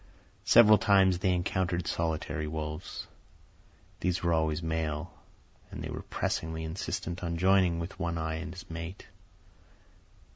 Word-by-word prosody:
Several 110 -3 +8
times 95 -3 +4
they 95 0 +2
encountered 90 0 0
solitary 80 -2 -2
wolves. 75 +1 -5 0.9
These 90 0 -1
were 85 -1 +2
always 80 0 +1
males, 80 0 -2 0.6
and - - -7
they - - -5
were - - -5
pressingly 80 0 -2
insistent 90 +2 -4
on 85 -1 -2
joining 95 -1 +4
with 90 +3 -6
One 85 -1 -1
Eye 80 0 -2
and 80 - -5
his 90 +1 -10
mate. 85 +3 -7
85 Hz, 135 wpm, -30 LUFS, 80-90 Hz, 0.9 s, Several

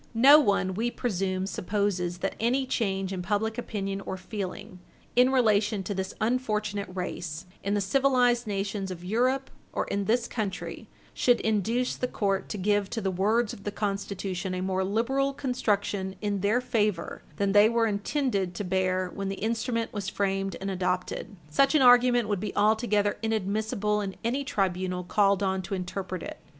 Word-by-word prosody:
No 280 +6 +9
one, 200 -7 +1
we 225 +5 0
presume, 190 -6 -1
supposes 190 -3 -1
that - - -1
any 255 +4 +1
change 195 -6 -1
in 185 - -3
public 215 +5 -1
opinion 195 -4 -3
or 190 - -5
feeling, 185 -1 -6 0.4
in 250 +2 +5
relation 215 -5 +2
to 205 - -3
this 190 0 -4
unfortunate 215 -4 -1
race, 175 -2 -5 0.2
in 200 +1 0
the 205 - +1
civilized 245 +1 +3
nations 200 -1 -2
of 180 -2 -7
Europe 255 +7 0 0.2
or - - -1
in 200 0 -2
this 235 +3 +1
country, 210 -5 -4 0.2
should 245 -1 +3
induce 220 +4 0
the 250 - -2
court 195 -4 -1
to 210 - -3
give 205 0 +1
to 230 - -3
the 195 -3 -1
words 210 +5 +1
of 200 - -11
the - - -2
Constitution 195 -2 -3
a 180 - -3
more 190 0 0
liberal 260 +8 0
construction 205 -7 -1
in 205 -1 -1
their 210 +6 +2
favor 210 -8 -1
than 200 +2 +1
they 205 +2 +6
were 230 0 +2
intended 205 -3 -1
to 205 - -3
bear 185 0 0
when 195 -1 -3
the 195 - -3
instrument 230 +2 -2
was 200 -3 -3
framed 195 -1 -1
and 195 +1 -3
adopted. 185 +2 -2
Such 275 - +3
an 290 - +5
argument 245 -2 +6
would 205 -2 0
be 205 +1 -4
altogether 210 -1 +2
inadmissible 210 -1 0
in 195 -2 -4
any 255 +5 0
tribunal 185 -5 -1
called 200 +1 +2
on 190 -1 0
to 190 +1 -4
interpret 185 0 -4
it. - - -7
205 Hz, 170 wpm, -27 LUFS, 190-230 Hz, 0.4 s, No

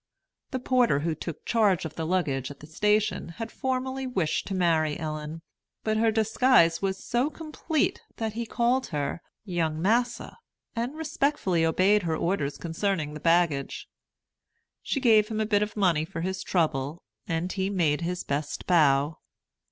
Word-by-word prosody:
The 260 - -2
porter 250 - +2
who 165 +1 0
took 160 0 -7
charge 205 -7 +2
of 160 - -5
the 160 0 -4
luggage 140 -8 0
at 145 - -10
the - - -11
station 210 +4 +1
had 225 -1 -5
formerly 260 0 -2
wished 185 -11 -1
to 195 - -2
marry 160 -4 +2
Ellen; 155 0 -5 0.4
but 215 0 +1
her 225 +1 +3
disguise 220 -5 +3
was 195 -1 -2
so 245 +5 +1
complete 310 -1 -2
that 220 -2 -3
he 230 +1 -4
called 245 +4 +1
her 150 +1 -3 0.2
"Young 165 -5 -1
massa," 235 - 0 0.4
and 240 +5 -2
respectfully 280 - 0
obeyed 190 +6 +3
her 165 -3 -1
orders 170 -6 -1
concerning 165 -2 -2
the 150 - -7
baggage. 165 -4 +1 0.9
She 275 - -1
gave 220 -4 +5
him 220 -1 -3
a 220 - +1
bit 205 -1 +2
of 210 0 -3
money 175 -6 +3
for 165 0 -6
his 190 +2 -2
trouble, 155 -2 -1 0.2
and 170 +1 -1
he 190 0 -1
made 170 -6 +1
his 175 +1 -2
best 145 +1 -3
bow. 150 -3 +3
185 Hz, 160 wpm, -27 LUFS, 160-225 Hz, 0.9 s, gave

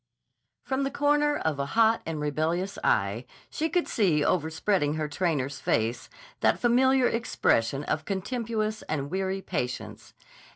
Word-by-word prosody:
From 265 0 -1
the 275 - 0
corner 290 +1 +2
of 155 -3 -2
a 140 - 0
hot 225 0 +4
and 160 -2 -3
rebellious 160 +6 -1
eye 110 +4 +1 0.2
she 320 +1 -1
could 355 0 0
see 165 -9 +2
overspreading 160 -2 +1
her 155 -1 -2
trainer's 145 -3 -1
face 115 +2 -1 0.3
that - - +3
familiar 260 +2 +3
expression 140 - +1
of 155 +1 -2
contemptuous 215 +1 -2
and 145 -1 -2
weary 190 +1 -2
patience. 110 - -5
175 Hz, 135 wpm, -27 LUFS, 145-230 Hz, 0.3 s, hot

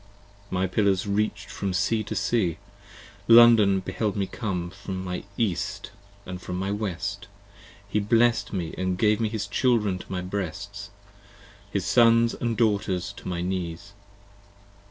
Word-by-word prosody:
My 95 0 0
pillars 95 0 +1
reach'd 100 0 -1
from 100 -2 -3
sea 110 +3 +1
to - - -4
sea; 95 -9 0 0.7
London 115 -5 +7
beheld 95 +2 -2
me 100 -2 0
come 90 -6 -4
25 100 - -16
From 95 -2 -5
my 90 -1 -4
east 100 -2 -2 0.3
& 90 -2 -8
from 90 0 -5
my 95 +2 -2
west, 100 0 -3 0.6
he 105 +1 0
blessed 115 +3 +2
me 90 -5 -3
and 95 -1 -1
gave 105 +2 +3
His 110 -2 -1
children 105 -3 +1
to - - -11
my 90 -1 -2
breasts, 100 +2 -5 0.8
his 100 -2 -2
sons 115 +3 +5
& 115 - -1
daughters 100 -5 0
to - - -9
my 90 -1 -2
knees. 90 0 -4
100 Hz, 145 wpm, -26 LUFS, 90-110 Hz, 0.8 s, London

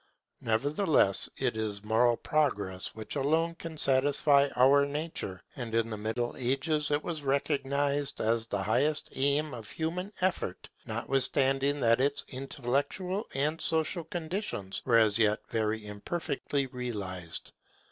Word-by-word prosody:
Nevertheless, 140 - +2
it - - 0
is 105 -2 -2
moral 115 +2 +3
progress 105 -12 -1
which 110 +4 -6
alone 160 +4 +1
can 165 -1 -8
satisfy 140 +1 +3
our 135 +3 +6
nature; 140 - -4
and 115 -3 -4
in 115 0 +1
the - - -2
Middle 115 +3 -2
Ages 145 +4 +1
it 145 +1 +1
was 165 -3 -4
recognized 140 0 0
as 115 0 +1
the 100 -3 -2
highest 145 +9 +1
aim 140 +2 +1
of 115 -3 -8
human 175 +5 -3
effort, 180 - -2 0.2
notwithstanding 135 +1 +2
that 115 +1 +4
its 140 +1 0
intellectual 140 - -2
and 150 +4 0
social 165 +2 0
conditions 160 - -4
were 120 -3 +5
as 110 -1 +4
yet 105 -1 +3
very 110 -1 -1
imperfectly 140 +6 -2
realized. 100 -9 -5
135 Hz, 130 wpm, -30 LUFS, 110-150 Hz, 0.2 s, our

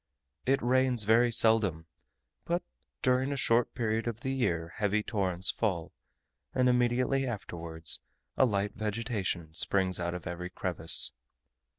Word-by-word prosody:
It 135 0 +2
rains 125 -2 +2
very 115 +3 +3
seldom, 110 -8 +2 0.6
but 175 +1 -1 0.4
during 130 +2 +2
a 140 - -2
short 120 -2 +1
portion 115 0 -1
of 115 0 -7
the 130 - -2
year 85 -10 -1
heavy 105 0 0
torrents 95 -4 0
fall, 90 -8 -2 0.6
and 125 0 +3
immediately 125 +2 +1
afterwards 85 -7 -4 0.4
a 130 - +4
light 100 -2 -1
vegetation 105 -7 -3
springs 95 +2 0
out 85 0 -3
of 90 - -8
every 90 +1 -5
crevice. 90 -3 +5
110 Hz, 130 wpm, -30 LUFS, 90-125 Hz, 0.6 s, crevice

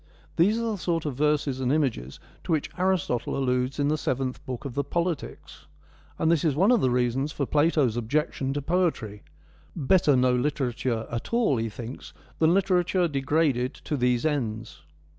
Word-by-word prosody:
These 200 +7 +3
were 230 -1 -1
the 210 - -3
sort 165 -2 -1
of 145 - -2
verses 145 -1 0
and 130 -1 0
images 125 - -1 0.2
to 185 - -4
which 155 -2 0
Aristotle 180 -12 0
alludes 125 0 0
in 145 -1 +1
the 155 +1 0
Seventh 130 -1 -2
Book 130 +3 -5
of 135 - -5
the 140 +2 -1
Politics; 170 +2 -4 0.5
and 160 - +2
this 165 -4 +2
is 155 -5 +1
one 190 +9 +4
of 240 -5 +4
the 130 - +3
reasons 125 +4 0
for 140 - -2
Plato's 145 -5 +2
objection 135 +3 -1
to 145 -1 -3
poetry; 155 - -1 0.5
better 155 -1 +3
no 125 0 +3
literature 125 -3 -1
at 115 0 -5
all, 220 - +2
he 115 0 -1
thinks, 120 +3 -9 0.3
than 160 0 +4
literature 180 -1 +2
degraded 140 -3 0
to 150 - -4
these 125 0 +1
ends. 115 -8 -2
140 Hz, 175 wpm, -26 LUFS, 125-165 Hz, 0.5 s, one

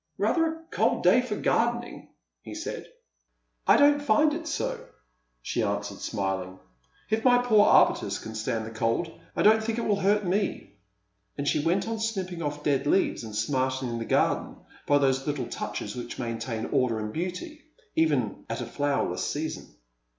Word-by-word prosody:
" - - -49
Rather 325 -1 +2
a 325 0 -6
cold - - +1
day 250 - +6
for 245 -4 -3
gardening," 240 +3 -1 0.3
he - - -9
said. - - -6 0.4
" - - -42
I - - +7
don't 290 0 +5
find 290 +4 +3
it 325 +1 -5
so," - - -2 0.6
she - - -1
answered, - - -2
smiling. 95 -1 -3 0.3
" - - -35
If 220 +1 +1
my 245 -1 +6
poor 225 -4 +4
arbutus - - +4
can 110 - -8
stand 110 0 -2
the 110 - -7
cold, 115 +9 -1 0.2
I - - +1
don't 220 +1 +5
think 225 0 -2
it 235 - -1
will 205 -2 +1
hurt 205 +1 +2
me 195 +3 -1 0.3
;" 100 0 -47
and 140 0 -3
she 150 - +1
went 180 +6 +1
on 225 -1 -3
snipping 190 -6 -3
ofE 150 -2 -4
dead 140 -1 +1
leaves, 190 -6 +2
and 110 -2 -7
smartening 130 +1 -1
the 115 - -4
garden - - +1 0.3
by 145 - +5
those 135 -1 +1
little 145 -4 -1
touches 105 -2 -5
which 120 -1 -6
maintain 115 -2 -3
order 130 -5 +1
and 105 0 -4
beauty 185 - -5 0.3
even 145 -10 +1
at - - -3
a - - -3
fiowerless 145 -1 -1
season. 155 +2 -4
150 Hz, 180 wpm, -27 LUFS, -, 0.6 s, I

